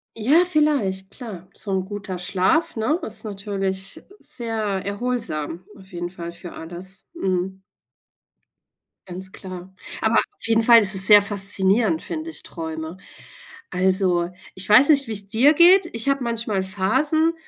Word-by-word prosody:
Ja, 290 +11 +3
vielleicht, 260 - 0
klar, 200 -8 -10
so 200 - -8
'n 190 -1 -1
guter 200 -2 -7
Schlaf, 190 - 0
ne, 295 +10 -1
ist 220 - -6
natürlich 195 -2 -5 0.2
sehr 230 -2 -7 0.3
erholsam, 200 -7 -4
auf 190 0 -17
jeden 175 -1 -5
Fall 170 -2 -8
für 175 0 -11
alles, 180 +3 -9
mhm. 190 - -3 1.5
Ganz 190 +1 -8
klar. 185 -1 -10 0.3
Aber - - +1
auf 410 - -2
jeden 225 0 +2
Fall 230 0 +7
ist 195 -2 +9
es 190 -1 +8
sehr 205 -1 +8
faszinierend, 205 +7 +2
finde 320 -1 -6
ich, 325 - -9
Träume. 160 +1 -7 0.7
Also, 180 -1 0 0.2
ich 185 0 -2
weiß 250 +8 +6
nicht, 280 -4 +4
wie's 205 -3 -5
dir 240 +8 +4
geht. 350 +3 +5
Ich 230 +4 -2
habe 275 -2 0
manchmal 230 -4 -2
Phasen, 265 - 0
200 Hz, 145 wpm, -21 LUFS, 185-245 Hz, 1.5 s, ist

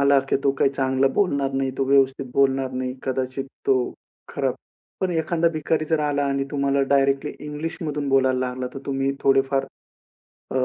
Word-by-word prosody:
आला 140 0 +5
की - - +3
तो 140 - +5
काही 135 - +4
चांगलं 135 0 +1
बोलणार 140 -9 +1
नाही, 135 0 0
तो 135 - +2
व्यवस्थित 135 -1 +3
बोलणार 135 -1 +2
नाही, 130 0 -3
कदाचित 130 0 -2 0.2
तो 135 - +5 0.5
खराब. - - -1 0.5
पण 185 -1 0
एखादा 165 0 +1
भिकारी 155 0 0
जर 160 -1 +2
आला 145 -1 0
आणि 140 0 0
तुम्हाला 140 -1 +1
डायरेक्टली 140 +1 +2
इंग्लिशमधून 150 -1 -4
बोलायला 130 -1 +3
लागला, 125 0 -2
तर - - -4
तुम्ही 135 0 0
थोडेफार 135 0 +2 0.9
अ, 130 -1 +2
135 Hz, 165 wpm, -23 LUFS, 135-145 Hz, 0.9 s, आला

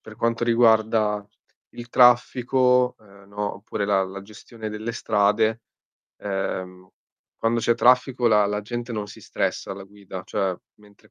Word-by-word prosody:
per 110 - -13
quanto 115 +1 0
riguarda 110 -3 +3 0.5
il 120 0 -9
traffico, 125 +1 +3
ehm, 100 -2 -19
no, 100 0 -4
oppure 100 0 -4
la 100 -1 +2
la 95 +1 -8
gestione 110 +2 -10
delle 110 +2 -5
strade, 110 0 +1 0.6
ehm, 95 -2 -4 0.5
quando 115 +1 0
c'è 120 +1 +2
traffico 125 -1 +3
la 105 -2 +4
la 105 +1 -2
gente 120 +2 -5
non 105 -2 -4
si - - -12
stressa - - -3
alla 95 0 -9
guida. 95 -2 -10
Cioè, 95 -3 -1 0.2
mentre 105 -1 -22
110 Hz, 145 wpm, -23 LUFS, 100-120 Hz, 0.6 s, la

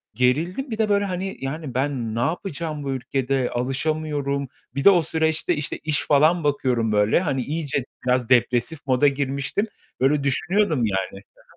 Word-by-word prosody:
gerildim. 165 - 0
Bir 220 - -3
de 220 -1 +1
böyle, 200 0 +2
hani, 190 0 -4
yani, 135 0 -4
ben 130 -4 -1
ne - - -1
yapacağım 160 0 -3
bu 140 - -2
ülkede? 130 0 -1
Alışamıyorum. 140 +2 -1 0.3
Bir 140 - -1
de - - +9
o 180 -3 +5
süreçte, 160 0 +1
işte, 150 0 -2
iş 155 -1 0
falan 155 +3 +4
bakıyorum 125 -6 +1
böyle. 105 +4 +3
Hani, 145 -7 -1
iyice 145 0 -2 0.2
biraz 125 -1 +1
depresif 125 +4 +2
moda 130 +3 +4
girmiştim. 140 +9 -1 0.3
Böyle, 140 +2 +2
düşünüyordum 160 - +1
yani. 95 -2 -1
Hı - - -9 0.2
hı. - - -21
140 Hz, 165 wpm, -23 LUFS, 130-160 Hz, 0.3 s, de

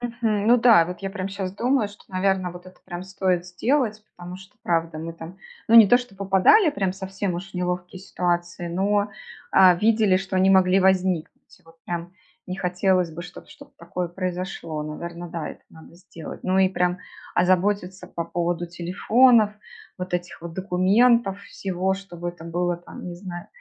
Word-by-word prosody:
Мгм, 230 -4 -1
ну 240 +1 +6
да, 225 -8 +6
вот 180 +1 -7
я 195 - -3
прям 195 -1 -4
щас 190 -1 -4
думаю, 245 -1 +1
что, 205 - -17
наверно, 185 -1 0
вот 175 +1 -12
это 185 - -15
прям 175 +1 -6
стоит 185 -2 -1
сделать, 215 +3 0
потому 180 +1 -9
что, 190 +1 -16
правда, 165 -2 -1
мы 165 +1 -6
там, 165 +3 -10 0.3
ну, 230 - +4
не 225 -3 +10
то 245 - +7
что 245 -4 -10
попадали 200 - +4
прям 195 -6 -1
совсем 190 -1 -4
уж 190 +3 -7
в - - -30
неловкие 180 +1 -3
ситуации, 175 -2 -2
но, 200 +3 0 0.4
э, 185 -2 +7
видели 215 -3 +3
что 190 0 -4
они 190 +1 +4
могли 190 0 +5
возникнуть. 185 -3 0
Вот 165 0 -20
прям, 175 +1 -5 0.3
не 185 +1 -5
хотелось 180 -1 +1
бы 170 +2 -8
чтоб 175 0 -12
что-то 285 0 -15
такое 180 -1 -4
произошло. 175 -3 -4
Наверно, 170 +3 -7
да, 165 -3 -4
это - - -11
надо 160 +1 -15
сделать. 170 -3 -10
Ну 185 +1 +1
и 190 -1 +5
прям 180 -1 0 0.4
озаботиться 185 0 +1
по 170 -2 -5
поводу 175 0 -2
телефонов, 210 +7 +3 0.5
вот 180 -1 -6
этих 175 -1 -4
вот 170 -1 -7
документов, 195 +3 +2
всего, 190 -3 -2
чтобы 175 -3 -7
это 175 -1 -9
было 175 +1 -1
там, 175 +1 -11
не 175 - -6
знаю, 175 -1 -8
185 Hz, 180 wpm, -24 LUFS, 175-195 Hz, 0.5 s, не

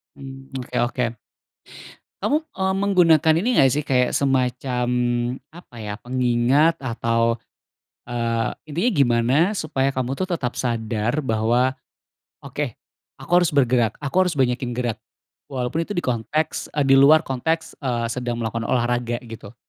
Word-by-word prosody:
Mmm 135 -1 -11
oke 125 - -3
oke. 120 0 -1 1.1
Kamu, 295 - +2 0.2
eee, 190 0 0
menggunakan 170 -6 +4
ini 220 - -2
nggak, 135 - +6
sih, 150 +2 0
kayak 125 -2 +2
semacam 125 -2 0 0.6
apa, 165 -7 -15
ya, 105 -1 -5
pengingat 125 +6 +2
atau 115 -2 0 0.7
eee, 115 -1 -1 0.2
intinya 175 +12 0
gimana 120 -3 +2 0.2
supaya 135 -5 0
kamu, 130 0 -2
tuh, 185 - -2
tetap 125 -5 -3
sadar 115 +3 -1
bahwa, 120 +3 +2 0.7
oke, - - -4 0.4
aku - - -12
harus 175 -3 +1
bergerak 120 -4 +3
aku 140 +4 -4
harus 165 - -2
banyakin 125 -2 0
gerak. 120 -3 -2 0.5
Walaupun 135 +5 -2
itu 205 - -5
di 175 - 0
konteks 125 +6 -1
eee, 145 - +2
di 135 0 +5
luar 155 +3 +7
konteks, 160 +5 -2
eee, 120 -4 -1
sedang 120 -1 -3
melakukan 115 0 -3
olahraga 120 0 0
gitu. 115 -1 -11
125 Hz, 135 wpm, -22 LUFS, 120-145 Hz, 1.1 s, luar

